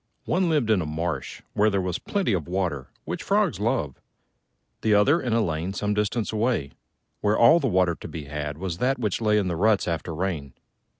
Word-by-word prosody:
One 180 0 +1
lived 145 -9 +2
in 100 -4 +3
a 80 - -3
marsh, 80 -2 -4
where 105 +1 +3
there 100 -2 0
was 90 -2 -2
plenty 195 - -1
of 85 -5 -2
water, 85 -8 -2 0.2
which - - -4
frogs - - +1
love: 70 -4 -1 0.8
the 110 -2 +3
other 140 +12 +4
in 125 - -2
a 115 +1 +3
lane 85 +2 -2
some 105 +1 -1
distance 105 +2 -1
away, 110 - 0 0.5
where 105 +1 +1
all 120 +9 +7
the 140 - 0
water 90 -5 +2
to - - -9
be 80 - -6
had 75 +1 -5
was 90 0 -4
that 135 +2 +1
which 110 -3 -1
lay 105 -1 +3
in 100 -3 +1
the 85 - -1
ruts 105 +3 +2
after 85 -1 -3
rain. 80 -7 -3
95 Hz, 205 wpm, -25 LUFS, 80-110 Hz, 0.8 s, all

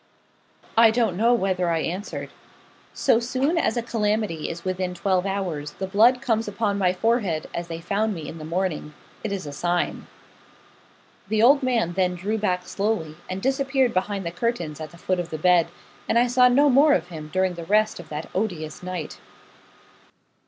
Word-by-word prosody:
I 230 0 +7
don't 220 -5 +1
know 230 +5 +3
whether 185 -5 0
I 165 -1 +1
answered. 185 +6 -4 0.6
'So 225 - +2
soon 265 +7 0
as 235 - 0
a 235 - 0
calamity 210 -7 -1
is 170 +1 -7
within 185 -1 -2
twelve 190 0 0
hours, 180 -7 -3
the 190 - -4
blood 225 +6 +4
comes 225 -2 0
upon 205 -1 -1
my 185 -2 +3
forehead, 195 -5 0
as 170 0 -4
they 165 -1 -5
found 205 +5 -1
me 160 -3 -7
in 165 - -8
the - - -8
morning 165 -2 -3 0.3
it 220 - -3
is 195 -4 -3
a 145 - -6
sign.' 175 +3 -1 1.2
The 220 0 +1
old 275 +4 +6
man 235 -9 0
then 180 0 +1
drew 205 +5 -2
back 180 -3 -1
slowly, 200 -7 -2
and 185 +1 -4
disappeared 270 -2 +1
behind 195 0 -1
the 170 - -2
curtains 175 -6 -3
at 155 - -6
the 170 - -15
foot 185 +1 -1
of 175 -1 -3
the 155 - -4
bed, 175 +1 +4 0.4
and - - +3
I 240 - +5
saw 250 +1 +5
no 280 +4 +4
more 285 +3 +5
of 175 +1 -2
him 155 -3 -8
during 185 0 +1
the 170 -1 -7
rest 215 +2 +2
of 170 - -11
that 150 +1 -5
odious 175 -7 -3
night. 180 -4 -6
190 Hz, 190 wpm, -24 LUFS, 170-225 Hz, 1.2 s, I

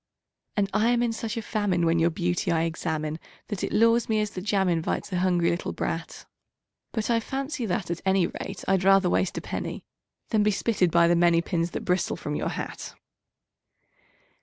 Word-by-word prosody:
And 200 -1 +2
I 215 +3 +3
am 240 0 +2
in 235 -1 0
such 225 0 -4
a 225 - -3
famine 205 -6 0
when 165 0 +3
your 165 +1 +4
beauty 175 +1 -1
I 165 -1 +2
examine 160 -1 -2 0.3
That 205 -4 -4
it - - -2
lures 230 +1 +3
me 220 -1 +2
as 210 -1 -1
the 185 - -6
jam 195 -1 +1
invites 170 +2 -1
a 180 - +1
hungry 175 -2 +2
little 170 - -3
brat; - - -4 0.7
But 220 +1 -1
I 230 - +3
fancy 270 +1 -3
that, 180 -2 -2
at 170 - -3
any 190 -2 +3
rate, 195 +2 -6
I'd 190 -1 +2
rather 195 -1 +5
waste 185 - 0
a - - -2
penny - - -5 0.4
Than 220 -3 +2
be 210 - +3
spitted 200 -3 +1
by 170 +1 +4
the 175 - +4
many 170 -1 +4
pins 170 -2 -1
that - - -5
bristle 180 0 +1
from 150 - -4
your - - -1
hat. - - -6
185 Hz, 200 wpm, -26 LUFS, 170-215 Hz, 0.7 s, rather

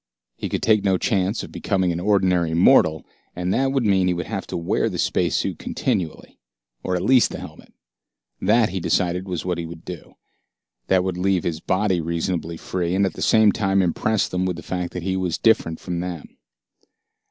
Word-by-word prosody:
He - - -5
could - - -3
take 110 -3 +3
no 95 -2 +2
chance 100 +1 0
of - - -9
becoming 95 -3 0
an 85 - -3
ordinary 90 -4 +2
mortal, 80 -2 +4 0.3
and 90 +1 -1
that 135 0 +1
would 135 -2 +1
mean 95 -3 +3
that - - +2
he - - +2
would 85 - -3
have 100 -3 -5
to - - -4
wear 85 0 0
the - - -5
space - - 0
suit - - -2
continually. 85 -4 -3 0.4
Or 90 - -2
at 90 - -2
least 130 -1 +4
the - - -6
helmet. - - -11 0.7
That, 110 +3 +3
he 95 +2 -3
decided, 90 +2 0
was 90 -3 -4
what 90 -2 -1
he 85 - -4
would 85 0 -11
do. 90 -3 -9 0.7
That 95 -1 +3
would 95 -1 -2
leave 95 -1 +1
his 80 -2 -2
body 95 0 0
reasonably 85 0 -2
free, 90 +1 -2
and 100 +1 +3
at 95 - -2
the - - -9
same 110 -2 +5
time 95 -2 +1
impress 105 +4 0
them 90 0 -1
with 90 - -2
the 85 - -9
fact 90 -1 -4
that 90 - -5
he 95 +1 -1
was 90 -3 -1
different 110 -8 +2
from 90 -1 -4
them. 90 -3 -6
90 Hz, 210 wpm, -22 LUFS, 85-95 Hz, 0.7 s, same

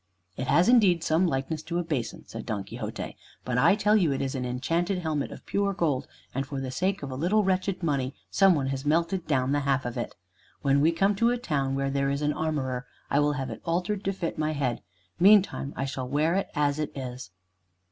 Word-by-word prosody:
"It 130 - -4
has 150 +8 +4
indeed 200 -9 +5
some 165 +4 +3
likeness 150 +1 -2
to 170 +2 -4
a 175 - 0
basin," 130 -9 -3
said 115 -1 -7
Don 105 -4 -2
Quixote, - - -6 0.3
"but 125 -1 0
I 160 - +5
tell 210 0 +3
you 175 -8 +3
it 135 - -1
is 135 -1 -2
an 130 -2 -3
enchanted 165 +10 0
helmet 155 -5 -2
of - - -10
pure 200 0 0
gold, 150 -7 0 0.3
and 135 - -1
for 140 0 -5
the 130 -1 -4
sake 185 +4 -1
of 140 - -5
a - - -4
little 185 +10 +2
wretched 190 -1 0
money 140 -4 0 0.2
some 195 -2 +5
one 140 -3 0
has 135 0 -3
melted 165 +4 +1
down 135 -3 +1
the 145 - +2
half 135 -2 0
of 120 0 -4
it. - - -4 0.5
When 140 0 +3
we 160 +3 +5
come 195 +5 +2
to 230 +2 +4
a 245 - +1
town 140 - -1
where 135 0 -1
there 140 0 +1
is 140 +1 -1
an 150 0 +2
armorer, 135 -5 -2 0.2
I 140 - +4
will 145 0 +3
have 135 -4 -3
it 110 - -8
altered 180 +4 -1
to 195 - +2
fit 180 -5 -4
my 155 0 0
head. 135 -5 -1 0.4
Meantime 195 -7 +5
I 135 - -2
shall 130 -2 -4
wear 150 +4 +2
it 195 +1 0
as 145 0 +1
it 150 - -2
is." 125 -5 -6
150 Hz, 230 wpm, -27 LUFS, 135-180 Hz, 0.5 s, indeed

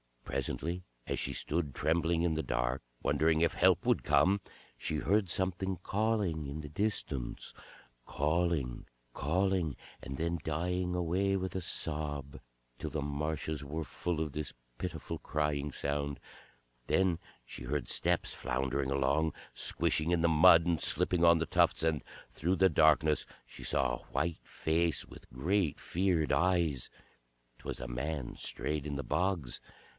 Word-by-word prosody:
Presently 85 +4 -3 0.2
as - - -2
she - - 0
stood 75 -4 -2
trembling 80 +2 +1
in 85 -2 +2
the 80 - 0
dark, - - -1 0.2
wondering 80 0 +2
if 85 - +3
help - - +3
would - - +3
come, 100 +2 +3 0.4
she 80 - -3
heard 95 +5 +1
something 95 +2 0
calling 100 -8 0
in 75 +3 -5
the 75 - -8
distance, 75 - -1 0.5
calling, 75 -4 0 0.3
calling, 90 0 0 0.3
and 70 0 -6
then 85 +1 -1
dying 90 +3 -1
away 90 +3 +1
with 95 -1 -2
a 95 - -2
sob, 75 -4 -3 0.4
till - - -3
the 75 - -3
marshes 75 +1 -3
were 80 +3 -4
full 85 +1 -3
of 75 -2 -2
this 75 +1 -4 0.3
pitiful - - -4
crying 75 -1 -1
sound; 70 0 -2 0.7
then 95 -3 +2 0.3
she - - -8
heard 65 +1 -2
steps - - +2
floundering 65 +2 -1
along, 70 +3 +1 0.2
squishing 80 +1 +4
in 85 -1 +2
the 85 - +4
mud 80 +1 +7
and 85 -3 +1
slipping 90 -2 +2
on 85 0 +7
the 80 - 0
tufts, 85 -2 +2
and 80 -3 +1 0.3
through 90 +5 0
the 95 0 +5
darkness 75 -1 +4 0.2
she - - -12
saw 60 -2 +1
a - - -13
white 80 +4 -1
face 80 -1 0
with - - -14
great 80 +6 0
feared 85 -3 +1
eyes. 85 -7 +2 0.7
'T - - -19
was - - -4
a 65 - -4
man 65 +2 -3
strayed 75 -1 -1
in 70 - -3
the 70 - -3
bogs. 90 -9 -1
80 Hz, 150 wpm, -32 LUFS, 70-90 Hz, 0.7 s, mud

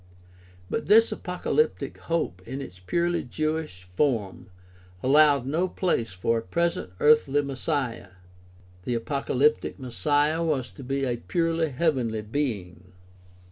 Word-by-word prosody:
But 225 - -3
this 225 +2 +6
apocalyptic 180 - -1
hope 160 - -2
in 130 +3 -5
its 90 -9 -9
purely 170 - 0
Jewish 155 - -3
form 115 -9 0 0.6
allowed 145 -1 +5
no 160 +7 0
place 170 - -1
for 115 +5 0
a - - -6
present 170 - -1
earthly 145 -1 +4
Messiah. 135 - -3 0.7
The 120 +4 -1
apocalyptic 140 +4 0
Messiah 145 +5 +1
was 140 -6 -1
to 140 - -11
be 135 +2 -2
a 120 -2 -1
purely 165 +3 0
heavenly 125 -7 0
being. 100 -8 -4
140 Hz, 120 wpm, -26 LUFS, 115-160 Hz, 0.7 s, this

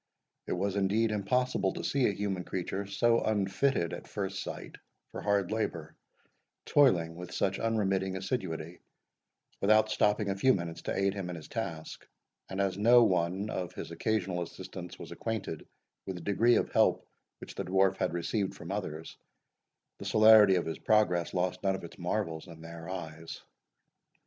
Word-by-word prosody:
It - - -1
was, 100 +2 -1
indeed, 105 +3 +2
impossible 105 0 0
to - - -6
see 135 -2 +2
a - - +2
human 95 -2 -3
creature, 95 +2 -4
so 115 +4 +3
unfitted, 100 -1 0
at - - -7
first 95 -1 -3
sight, - - -7 0.3
for - - -6
hard 100 -2 +1
labour, 85 -8 -3 0.7
toiling 85 - +3
with 90 0 -8
such 95 0 0
unremitting 95 -4 0
assiduity, 90 -5 -4 0.8
without 110 +1 +4
stopping 105 -1 +2
a - - -2
few 130 +7 +4
minutes 85 -2 -5
to - - -3
aid 95 0 +2
him 95 -3 -5
in 90 - -4
his 80 - -9
task; 85 -9 -5 0.4
and, 95 - -5
as 100 -1 0
no 120 +3 +7
one 95 +1 0
of 90 -2 -4
his - - -6
occasional 95 -5 -1
assistants 90 +1 -8
was - - -9
acquainted 110 -8 -4 0.4
with 95 - -3
the 90 - -8
degree 115 +5 +3
of - - 0
help - - +3 0.3
which - - -9
the - - -4
Dwarf 95 +1 +2
had - - 0
received 85 +4 -2
from 85 - -8
others, 80 -6 -5 0.8
the - - -7
celerity 110 -2 +7
of 90 - 0
his 80 - -4
progress 90 -6 +2
lost 90 0 -1
none 95 -1 +1
of 95 - -8
its 85 - -10
marvels 85 -2 -2
in 80 -2 -12
their 85 +1 -9
eyes. 80 -3 -7
95 Hz, 170 wpm, -30 LUFS, 85-105 Hz, 0.8 s, no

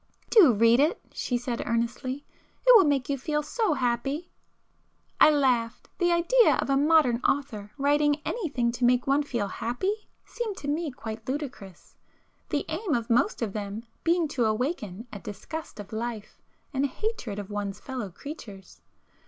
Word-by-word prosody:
"Do 385 - +8
read 230 +2 +4
it!" 310 +10 +2
she 245 - -1
said 240 -1 -3
earnestly—"It 255 - 0
will 405 - +8
make 275 -4 +1
you 275 -1 -1
feel 300 +3 -1
so 350 +2 0
happy!" 270 +6 -1 0.9
I - - +8
laughed. 255 -6 +1
The 350 -1 +3
idea 350 +8 +4
of - - -1
a - - +4
modern 290 -4 +4
author 235 -6 -1
writing 290 +1 +2
anything 280 - -1
to 240 +1 -5
make 245 0 +4
one 275 +2 +3
feel 235 -8 -2
happy, 245 - -2 0.3
seemed 445 -5 -4
to 285 - -7
me 310 +2 -1
quite 225 -3 -7
ludicrous, 255 - -6 0.5
the 290 - -1
aim 330 +1 -1
of 235 -1 -2
most 245 - +2
of 205 -4 -3
them 210 +1 -5 0.2
being 335 -1 +2
to 250 -5 0
awaken 220 - -2
a 205 - -6
disgust 225 +8 -7
of 205 +1 -9
life, 225 -1 -5 0.3
and 270 0 0
a - - +2
hatred 275 - -4
of 205 0 -6
one's 205 -1 -4
fellow 255 -7 -5
creatures. 205 - -10
260 Hz, 160 wpm, -27 LUFS, 230-305 Hz, 0.9 s, Do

